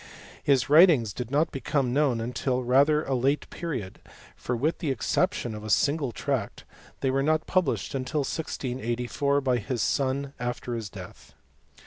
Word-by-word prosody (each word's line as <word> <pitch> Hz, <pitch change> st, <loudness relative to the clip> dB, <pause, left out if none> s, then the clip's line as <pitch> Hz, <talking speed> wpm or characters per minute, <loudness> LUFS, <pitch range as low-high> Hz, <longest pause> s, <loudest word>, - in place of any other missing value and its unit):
His 135 Hz, -3 st, +3 dB
writings 145 Hz, -, +6 dB
did 120 Hz, +1 st, -5 dB
not 145 Hz, +4 st, +1 dB
become 135 Hz, -1 st, -1 dB
known 125 Hz, -5 st, +1 dB
till 130 Hz, -1 st, -1 dB
rather 140 Hz, +5 st, +3 dB
(late 135 Hz, +3 st, +1 dB
period; 130 Hz, -, -5 dB, 0.4 s
for, 125 Hz, -, -3 dB
with 150 Hz, +8 st, 0 dB
the 160 Hz, -, -2 dB
exception 135 Hz, -, 0 dB
of 105 Hz, 0 st, -7 dB
a 110 Hz, -, -6 dB
single 140 Hz, +2 st, +2 dB
tract, -, -, -3 dB, 0.4 s
they 135 Hz, -, +1 dB
were 135 Hz, +1 st, +1 dB
not 155 Hz, +2 st, +1 dB
published 185 Hz, -1 st, 0 dB
till 135 Hz, -, -2 dB
1648, 130 Hz, -1 st, -2 dB
by 130 Hz, -2 st, +2 dB
his 120 Hz, +2 st, -2 dB
son, 140 Hz, +1 st, -1 dB
after 120 Hz, 0 st, -3 dB
his 115 Hz, -3 st, -4 dB
death. -, -, -12 dB
135 Hz, 150 wpm, -27 LUFS, 120-145 Hz, 0.4 s, writings